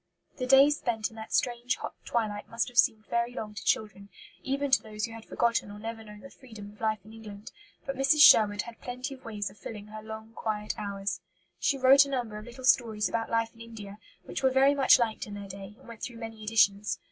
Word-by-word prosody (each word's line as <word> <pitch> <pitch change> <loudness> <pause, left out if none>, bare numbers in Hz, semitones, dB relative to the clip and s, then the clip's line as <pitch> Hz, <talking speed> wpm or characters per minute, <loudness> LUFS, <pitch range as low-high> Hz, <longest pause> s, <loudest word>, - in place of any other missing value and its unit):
The 255 - -3
days 275 +3 +6
spent 225 -5 -2
in - - -15
that 220 - -9
strange 245 +1 0
hot - - -7
twilight 210 -3 -2
must 230 +2 -1
have 245 - -15
seemed 220 -3 +3
very 235 +1 -1
long 210 -3 -5
to 205 - -8
children, 200 -2 -1 0.3
even 275 +1 -2
to 265 - +5
those 215 -1 -4
who 230 - -9
had 225 -1 -10
forgotten 230 -3 0
or 205 - -9
never 225 +1 -6
known 210 -1 -12
the 275 - -12
freedom 220 -6 -12
of 210 - -20
life 215 -3 -1
in 215 - -13
England; 210 -2 -10 0.3
but 275 - -3
Mrs. 270 +3 +3
Sherwood 205 -7 +7
had 235 -1 -12
plenty 250 +2 -5
of 265 - -15
ways 205 -3 -4
of 200 - -20
filling 210 -2 -8
her 215 0 -8
long 220 +1 -9
quiet 210 -2 -3
hours. 200 -3 -4 0.4
She 275 - +1
wrote 270 +2 +7
a - - -8
number 240 -6 -3
of 215 - -11
little 255 +2 -9
stories 220 -5 +3
about 225 +3 -2
life 230 0 0
in 230 - -16
India, 215 -3 -10 0.2
which - - -5
were 265 - +4
very 265 +2 +4
much 275 -2 +6
liked 225 -3 -2
in 205 - -7
their 200 -1 -7
day 195 +1 -9
and - - -19
went 230 -2 -11
through 240 -2 -6
many 225 -1 -8
editions. 210 -1 +2
225 Hz, 235 wpm, -29 LUFS, 210-245 Hz, 0.4 s, Sherwood